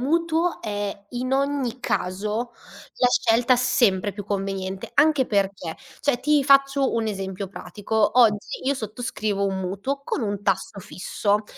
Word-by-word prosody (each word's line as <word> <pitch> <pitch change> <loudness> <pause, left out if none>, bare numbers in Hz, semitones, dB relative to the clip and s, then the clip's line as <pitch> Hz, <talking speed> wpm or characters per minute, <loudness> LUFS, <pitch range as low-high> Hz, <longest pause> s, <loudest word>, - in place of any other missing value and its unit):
mutuo 330 +4 +1
è, 205 -2 -4
in 250 +1 -3
ogni 270 -3 0
caso, 210 +5 -2 0.5
la 250 - +4
scelta 235 +1 +3
sempre 230 -6 +2
più 205 0 -7
conveniente. 195 -1 -3
Anche 295 -3 +4
perché, 195 -5 -1 0.2
cioè 280 -4 +1
ti 295 +2 +3
faccio 275 0 +4
un 230 -1 0
esempio 195 -1 -4
pratico: 210 +5 -1
oggi 215 -4 +3
io 280 - +3
sottoscrivo 215 -3 -2
un 190 -1 -2
mutuo 200 +10 -3
con 275 - -2
un 205 -2 -2
tasso 195 +1 -1
fisso 205 +3 -1
215 Hz, 140 wpm, -24 LUFS, 200-260 Hz, 0.5 s, la